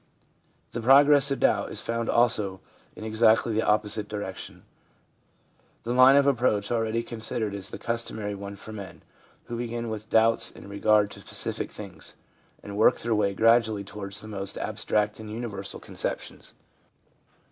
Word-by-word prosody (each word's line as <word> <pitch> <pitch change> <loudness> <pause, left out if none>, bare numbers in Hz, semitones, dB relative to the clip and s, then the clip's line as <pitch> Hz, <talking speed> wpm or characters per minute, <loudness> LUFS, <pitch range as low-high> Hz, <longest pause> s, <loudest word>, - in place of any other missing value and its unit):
The 120 - -5
progress 140 +3 +6
of 135 - -2
doubt - - +1
is - - -5
found 115 0 -3
also 105 -5 +2 0.4
in - - -9
exactly 110 +1 +2
the 110 - +1
opposite 105 0 0
direction. 100 -3 -7 1.2
The 120 - -2
line 130 +2 +7
of 140 0 +4
approach 120 -7 +1
already 115 0 -1
con 115 -1 -8
sidered 110 -2 -2
is 100 -1 -5
the - - -7
customary 115 -3 -3
one 100 0 -8
for 110 +2 -11
men, 100 -3 -10 0.4
who 120 - -6
begin 120 -1 -4
with 110 0 -7
doubts 115 0 +5
in - - -13
regard 105 +1 +2
to - - -11
specific - - +1
things, - - -10 0.5
and 100 0 -7
work 110 - +4
their 115 0 -1
way 100 -2 0
gradually 115 -1 +3
towards 100 0 -6
the 110 - -11
most 100 -2 -1
abstract 105 0 -2
and 110 -1 -9
universal 105 -3 -6
conceptions. - - -4
110 Hz, 160 wpm, -26 LUFS, 105-115 Hz, 1.2 s, line